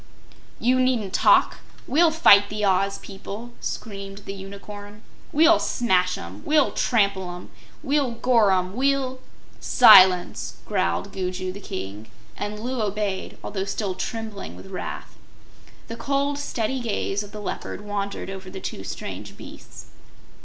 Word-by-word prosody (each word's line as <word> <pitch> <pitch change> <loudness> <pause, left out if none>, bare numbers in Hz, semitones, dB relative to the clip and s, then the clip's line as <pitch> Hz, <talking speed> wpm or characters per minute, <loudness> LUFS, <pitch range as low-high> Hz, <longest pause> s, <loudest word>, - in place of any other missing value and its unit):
"You 255 +2 +2
needn't 240 -7 +1
talk! - - +4 0.3
We'll 330 +5 +4
fight 205 -11 +6
the 210 0 -1
Oz 195 +1 +2
people!" 205 +4 -9
screamed 200 -1 -6
the 195 - -5
Unicorn. 205 +2 -10 0.3
"We'll 325 +3 +5
smash 185 -6 +1
'em; 90 +4 -9
we'll 300 -2 +3
trample 200 -6 +1
'em; 180 - -11 0.3
we'll 280 -1 +1
gore 230 -3 +3
'em; 185 0 0
we'll 265 0 0 0.3
" - - -27 0.2
"Silence!" 185 -1 +7
growled 200 - -1
Gugu 185 0 -3
the 195 - -9
King, 100 - -7 0.3
and 210 +1 -5
Loo 245 +2 -3
obeyed, 205 -2 -3
although 195 -2 -3
still 200 -1 -2
trembling 220 +1 -5
with 190 - -12
wrath. 185 - -6 0.7
The 230 - -7
cold, 280 +2 -1
steady 260 -2 -2
gaze 205 -3 -2
of 205 -1 -9
the 215 - -8
Leopard 205 - -5
wandered 200 -1 -4
over 190 -1 -8
the 190 - -8
two 95 - -6
strange 95 - -7
beasts. - - -12
205 Hz, 140 wpm, -24 LUFS, 190-240 Hz, 0.7 s, Silence